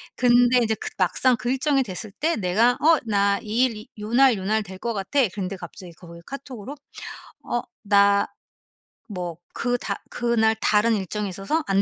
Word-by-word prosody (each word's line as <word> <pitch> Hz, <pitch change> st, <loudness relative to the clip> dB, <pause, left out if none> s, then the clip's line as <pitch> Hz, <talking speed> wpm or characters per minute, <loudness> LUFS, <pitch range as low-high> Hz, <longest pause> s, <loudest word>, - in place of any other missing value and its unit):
근데 245 Hz, 0 st, +4 dB
이제 220 Hz, -1 st, +1 dB
그 -, -, -5 dB
막상 240 Hz, +7 st, +3 dB
그 240 Hz, +3 st, -2 dB
일정이 270 Hz, 0 st, +2 dB
됐을 205 Hz, -1 st, -6 dB
때 320 Hz, +11 st, -1 dB
내가 215 Hz, +5 st, +3 dB
어 325 Hz, +2 st, +5 dB
"나 200 Hz, -2 st, +2 dB
이 225 Hz, +4 st, +2 dB
일, 240 Hz, -3 st, -2 dB
이 215 Hz, -, -11 dB
요 210 Hz, -, -5 dB
날 265 Hz, 0 st, +6 dB
요 190 Hz, -, -6 dB
날 215 Hz, +1 st, +1 dB
될 190 Hz, -1 st, -10 dB
거 235 Hz, +3 st, -2 dB
같아." 200 Hz, +9 st, -1 dB, 0.2 s
근데 195 Hz, -1 st, -4 dB
갑자기 175 Hz, +1 st, -10 dB
거기 170 Hz, 0 st, -13 dB
카톡으로 270 Hz, -2 st, -8 dB, 0.7 s
"어 240 Hz, -, -1 dB, 0.2 s
나 200 Hz, -1 st, +4 dB, 0.8 s
뭐 180 Hz, -4 st, -5 dB, 0.2 s
그 245 Hz, 0 st, -1 dB
다 -, -, -5 dB
그날 230 Hz, -2 st, +1 dB
다른 220 Hz, +1 st, +3 dB
일정이 205 Hz, +1 st, -3 dB
있어서 195 Hz, -, -2 dB
안 195 Hz, 0 st, +3 dB
215 Hz, 285 characters per minute, -23 LUFS, 195-245 Hz, 0.8 s, 날